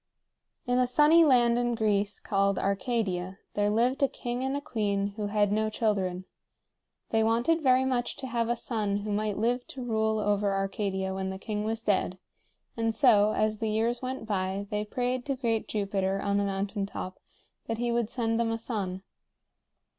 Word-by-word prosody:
In 245 0 +1
a 250 - +3
sunny 300 +6 +6
land 240 -5 +4
in 240 -1 0
Greece 210 -2 0
called 200 -1 +1
Arcadia 195 -2 -1 0.2
there 205 0 +1
lived 240 +6 +1
a 275 - +5
king 245 -1 -4
and 265 +1 -1
a - - -1
queen 205 -6 -1
who 210 -1 -3
had 205 -1 +2
no 215 +1 +1
children. 195 -5 -1 0.9
They 225 - +3
wanted 235 +9 +2
very 260 -2 +4
much 250 -2 -1
to 270 - -6
have 235 -2 -1
a 240 - +2
son 210 -4 -1
who 210 - -2
might 210 0 -1
live 245 +3 0
to 260 - -7
rule 220 -2 +1
over 205 -1 +1
Arcadia 195 -1 -2
when 190 0 -3
the 190 - -5
king 210 +1 -3
was 225 +1 -2
dead, 190 -3 +1 0.6
and 225 -1 0
so, 215 -5 +5
as 215 0 0
the 220 - -1
years 230 +3 0
went 255 -2 -4
by, 195 -1 -2
they 210 0 0
prayed 250 +3 -2
to 275 - 0
great 230 -4 -1
Jupiter 195 -2 -1
on 200 0 0
the 200 - +1
mountain 195 +1 -2
top 185 -2 -6 0.5
that 225 - -2
he 240 +1 -1
would 235 -2 0
send 225 -2 -1
them 230 -1 +1
a 225 - -1
son. 195 -5 -3
220 Hz, 185 wpm, -28 LUFS, 200-240 Hz, 0.9 s, sunny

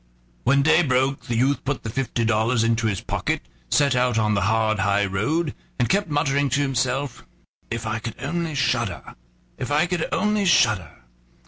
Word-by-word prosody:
When 140 +2 +4
day 160 +3 +5
broke 135 -2 0
the 120 - -1
youth 135 +4 +1
put 140 0 -3
the 115 - -4
fifty 120 -2 -1
dollars 110 +1 +2
into 115 0 +1
his 100 -4 -2
pocket, - - -2 0.3
set 140 -3 +3
out 125 -2 +1
on 105 -1 +2
the 100 - +1
hard 110 -2 +1
high 100 +1 +2
road, 135 - -1 0.2
and 125 - +1
kept 200 -2 +1
muttering 145 -1 +1
to 135 +3 +1
himself: 130 0 -1 0.5
"If 115 0 -4
I 110 +1 -2
could 115 -1 -6
only 165 +2 -3
shudder! 120 -7 -1 0.5
if 125 - -4
I 150 +3 +3
could 175 -2 -2
only 210 -1 +1
shudder!" 95 - +2
125 Hz, 180 wpm, -23 LUFS, 110-145 Hz, 0.5 s, day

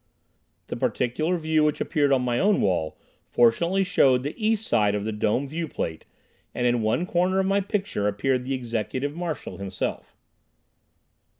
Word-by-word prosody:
The - - -5
particular 155 +9 0
view 155 -1 +1
which 150 -1 +1
appeared 145 -4 +1
on 130 -2 +3
my 120 -1 0
own 205 +1 +3
wall 85 -5 0 0.3
fortunately 170 +12 +3
showed 135 -9 +3
the 145 - -3
east 220 -1 0
side 105 -1 +2
of 105 - -2
the 110 - -2
dome 110 +6 0
viewplate 155 - -4 0.5
and 125 - -1
in 120 -1 +2
one 110 +11 +1
corner 180 +2 +1
of 190 - +1
my 195 +1 +2
picture 195 - -2
appeared 125 +5 0
the 135 +1 -2
Executive 130 +4 -3
Marshal 170 -4 -5
himself. 95 -1 -5
135 Hz, 160 wpm, -25 LUFS, 115-175 Hz, 0.5 s, on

